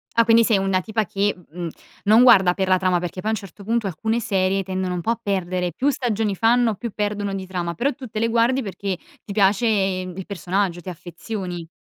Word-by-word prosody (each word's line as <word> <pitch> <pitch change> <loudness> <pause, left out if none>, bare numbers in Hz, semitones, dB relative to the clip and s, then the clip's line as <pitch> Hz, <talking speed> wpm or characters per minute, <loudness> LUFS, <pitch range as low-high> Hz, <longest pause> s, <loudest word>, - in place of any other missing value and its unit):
Ah 230 - +6
quindi 230 0 +6
sei 220 -3 +3
una 190 -1 +1
tipa 220 +2 -1
che, 200 +3 0
mhmm, 175 0 -11
mhmm, - - -3 0.4
non 220 +4 +6
guarda 195 -8 +7
per 190 0 -1
la 185 0 +4
trama, 180 -1 +1
perché 175 +1 -5
poi 215 - -2
a - - +1
un - - 0
certo 200 +1 -12
punto 225 +1 0
alcune 220 +7 -1
serie 195 -2 0
tendono 185 -1 -2
un 175 - -3
po' 225 - 0
a 235 - -2
perdere, 185 -3 -1
più 275 +10 +1
stagioni 220 -6 -1
fanno 230 +1 +3
più 235 +1 -5
perdono 205 -1 -2
di 190 -1 -5
trama, 175 -2 -3
però 275 - 0
tu 255 0 -9
te 215 0 -4
le 230 - +2
guardi 235 +3 +2
perché 195 -2 -4 0.3
ti 200 - -7
piace, 205 +3 +3
mhmm, 190 -3 0
il 190 - -5
personaggio, 190 -2 -2
ti 185 - -7
affezioni. 175 0 -6
195 Hz, 235 wpm, -22 LUFS, 185-225 Hz, 0.4 s, guarda